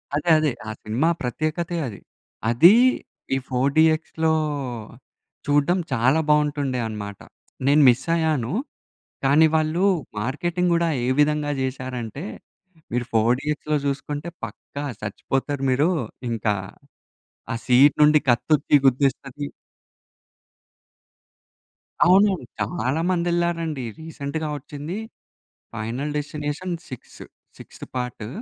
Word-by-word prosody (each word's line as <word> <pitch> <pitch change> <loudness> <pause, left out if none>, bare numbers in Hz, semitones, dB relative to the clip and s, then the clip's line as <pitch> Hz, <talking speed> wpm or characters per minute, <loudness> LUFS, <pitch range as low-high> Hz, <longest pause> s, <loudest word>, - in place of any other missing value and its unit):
అదే 150 +4 -1
అదే. 155 -2 +1 0.2
ఆ - - -3
సినిమా 120 +10 +1
ప్రత్యేకతే 155 +7 -2
అది. 105 -5 -8 0.5
అది 165 - +7 0.6
ఈ - - +1
4 130 +2 +1
డీఎక్స్‌లో 160 0 +3 1.1
చూడడం 145 +5 +2
చాలా 130 +5 +3
బాగుంటుండే 145 -3 +1
అనమాట. 100 -2 -6 0.5
నేను 145 +2 +5
మిస్ 125 +2 +1
అయ్యాను. 155 -7 0 0.7
కానీ, 145 +4 +6
వాళ్ళు 155 +3 +1 0.4
మార్కెటింగ్ 175 +9 -1
కూడా 170 0 +2 0.2
ఏ - - -1
విధంగా 150 0 +2
చేసారంటే, 130 0 -4 0.7
మీరు 125 0 0
4 115 +2 +4
డీఎక్స్‌‌లో 150 0 -1
చూసుకుంటే 145 +3 -3 0.2
పక్కా 145 - -8 0.2
చచ్చిపోతారు 135 +7 -3
మీరు. 145 +6 +3 0.4
ఇంకా 110 -2 0 1.0
ఆ - - -2
సీన్ 130 +4 +6
నుండి 150 0 +6
కత్తొచ్చి 140 +5 +3
గుద్దేస్తది. 135 +2 0 2.6
అవునవును. 190 -4 +4
చాలా 125 +8 -1
మందెళ్లారండి. 170 -4 0 0.2
రీసెంట్‌గా 155 -1 -5
వచ్చింది 145 +5 -7 0.8
final 120 +7 -3
destination 150 +4 -3
six 130 - -11 0.4
sixth - - -11
part. 125 -4 -4
145 Hz, 100 wpm, -23 LUFS, 125-160 Hz, 2.6 s, అది